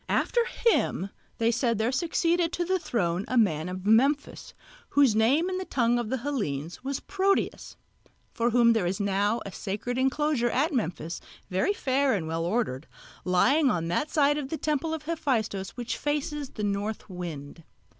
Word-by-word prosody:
After 475 - +2
him, 200 - +1 0.3
they 230 0 +2
said, 235 -1 +1
there 220 +3 +1
succeeded 335 +3 +1
to 350 - -1
the 375 +1 +1
throne 180 - -1
a 255 - -1
man 180 -7 +2
of 185 +1 -6
Memphis, 270 +7 +2 0.3
whose 275 -6 +4
name 265 +10 +3
in 370 0 -2
the - - -3
tongue 240 -4 +1
of 235 -3 -3
the 260 - 0
Hellenes 200 - -3
was 275 0 -3
Proteus; 395 0 -1 0.6
for 235 0 +1
whom 235 -1 +5
there 210 -6 +1
is 190 +4 -2
now 200 +3 +1
a 200 - -6
sacred 215 +7 -3
enclosure 265 -2 +1
at 295 +7 +1
Memphis, 170 - -3 0.3
very 190 - +1
fair 270 - +1
and 165 -5 -3
well 165 +1 -2
ordered, 175 - -1 0.4
lying 265 - +4
on 165 -6 -1
that 290 - 0
side 290 -1 +3
of 270 -2 -5
the 320 - -3
temple 305 +1 -1
of 320 -2 -4
Hephaistos 235 - -1
which 240 -1 -3
faces 295 -1 -2
the 210 - -6
North 205 +1 -2
Wind. 165 -4 -7
240 Hz, 175 wpm, -27 LUFS, 195-290 Hz, 0.6 s, whom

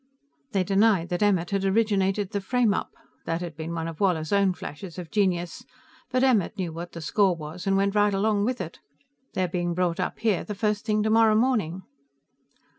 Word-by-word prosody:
"They 195 -2 +2
denied 195 -2 +3
that 175 +2 -2
Emmert 190 -4 +2
had 195 -1 0
originated 195 -1 +1
the 205 - -1
frameup. 230 0 +1 0.4
That 165 +1 -2
had 170 -3 -6
been 160 +2 -5
one 165 0 -3
of 165 -2 -7
Woller's 175 -4 +1
own 200 -2 +3
flashes 160 +3 -8
of 175 -3 -7
genius, 180 -4 0 0.5
but 255 0 +1
Emmert 220 -6 +2
knew 175 -4 -3
what 170 +2 -7
the 170 - -7
score 190 +3 +2
was 165 +4 -8
and 195 0 +3
went 195 0 +1
right 205 0 +3
along 205 +1 +1
with 250 +1 -1
it. 170 -2 -7 0.6
They're 185 -1 +1
being 175 0 -2
brought 175 -2 0
up - - -2
here 215 -6 +1
the 210 - -6
first 210 0 -1
thing 215 -2 +1
tomorrow 220 0 +4
morning." 215 -7 +1
195 Hz, 190 wpm, -26 LUFS, 175-210 Hz, 0.6 s, tomorrow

